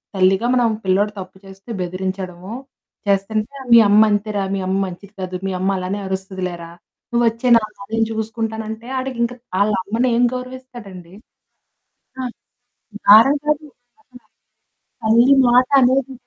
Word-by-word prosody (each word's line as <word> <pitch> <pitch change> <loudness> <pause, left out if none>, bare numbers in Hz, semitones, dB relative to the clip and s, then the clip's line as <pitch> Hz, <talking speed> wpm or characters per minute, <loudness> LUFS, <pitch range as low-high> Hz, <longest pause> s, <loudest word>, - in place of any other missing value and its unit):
తల్లిగా 190 +5 +2
మనం 245 -2 +3 0.2
పిల్లోడు 200 +3 +2
తప్పు 185 0 -10
చేస్తే 195 +4 -15
బెదిరించడమో 185 +1 -5 0.5
చేస్తుంటే," 215 +6 -1 0.2
మీ 235 - +9
అమ్మ 210 +1 +6
అంతేరా! 205 -1 -1
మీ 195 - -3
అమ్మ 190 - 0
మంచిది 190 +3 -11
కాదు. 185 0 -5
మీ 190 - -2
అమ్మ 190 +1 0
అలానే 185 +3 -3
అరుస్తది 190 0 -5
లేరా! 170 -1 -9 0.4
నువ్వొచ్చేయి 235 +1 +2
నాతోని, 215 -2 -6
నేను 225 0 +1
చూసుకుంటాను." 220 0 -4
అంటే 220 +2 -8
ఆడికింకా 245 -2 -2 0.2
ఆళ్ళమ్మని 210 +4 0
ఏం 245 - +3
గౌరవిస్తాడండి? 245 -9 -10 1.1
ఆ! - - -3 0.9
మారం 225 +7 +8
కాదు. 300 0 0 1.4
తల్లి 235 +5 +5
మాటనేది, 260 +1 +3
215 Hz, 120 wpm, -19 LUFS, 190-240 Hz, 1.4 s, మీ